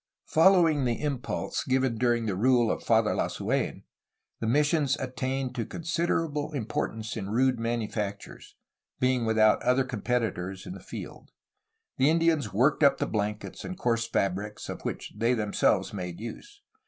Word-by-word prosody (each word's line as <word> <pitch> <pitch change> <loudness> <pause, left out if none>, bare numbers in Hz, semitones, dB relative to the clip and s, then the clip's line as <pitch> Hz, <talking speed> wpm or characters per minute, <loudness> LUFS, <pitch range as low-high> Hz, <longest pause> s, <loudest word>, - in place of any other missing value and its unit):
Following 165 -4 +4
the 120 -2 0
impulse 140 -4 -2
given 130 -2 +1
during 120 -1 +2
the 100 -4 -1
rule 120 +2 +3
of - - -3
Father 110 -2 +3
Lasu^n, - - -1 0.6
the 115 - -2
missions 145 +2 +2
attained 130 0 -3
to 120 -3 -2
considerable 165 0 -2
importance 110 -3 -3
in 100 -3 -4
rude 125 +2 +2
manufactures, 110 -3 -4 0.4
being 125 -2 +2
without 110 -1 +4
other 125 +2 +3
competitors 110 -6 -2
n 180 - -6
the - - -9
field. - - -9 0.7
The 135 +2 +4
Indians 160 -7 +2
worked 130 +10 +2
up 140 -2 +5
the - - 0
blankets 105 0 -3
and 185 - -6
coarse 115 -8 0
fabrics 100 -1 -2
of - - -6
which - - -5
they 115 +3 +2
themselves 105 -1 +1
made 90 -3 -5
use. 405 - -9
125 Hz, 145 wpm, -28 LUFS, 110-140 Hz, 0.7 s, up